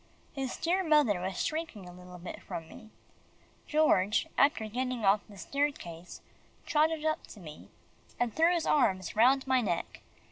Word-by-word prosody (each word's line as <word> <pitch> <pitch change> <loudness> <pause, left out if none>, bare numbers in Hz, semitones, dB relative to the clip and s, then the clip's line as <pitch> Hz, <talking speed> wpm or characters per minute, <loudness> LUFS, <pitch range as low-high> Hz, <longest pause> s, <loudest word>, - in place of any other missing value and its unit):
His 270 -3 -4
dear 365 +3 +1
mother 295 - +3
was 185 0 -2
shrinking 310 - -4
a 180 - -11
little 180 0 -12
bit 175 +1 -8
from 165 -1 -7
me. 220 +5 -13 0.8
George, 215 -10 +3
after 280 -5 +3
getting 250 0 -3
off 200 +2 +4
the 205 - -13
staircase, 185 - -4 0.4
trotted 310 +1 +1
up 310 0 -1
to 215 - -12
me, 155 -4 -11 0.5
and 240 -2 0
threw 330 +2 +4
his 345 -2 0
arms 185 - +1
round 255 +4 +4
my 260 -1 +2
neck. 175 -7 -3
245 Hz, 155 wpm, -30 LUFS, 185-300 Hz, 0.8 s, off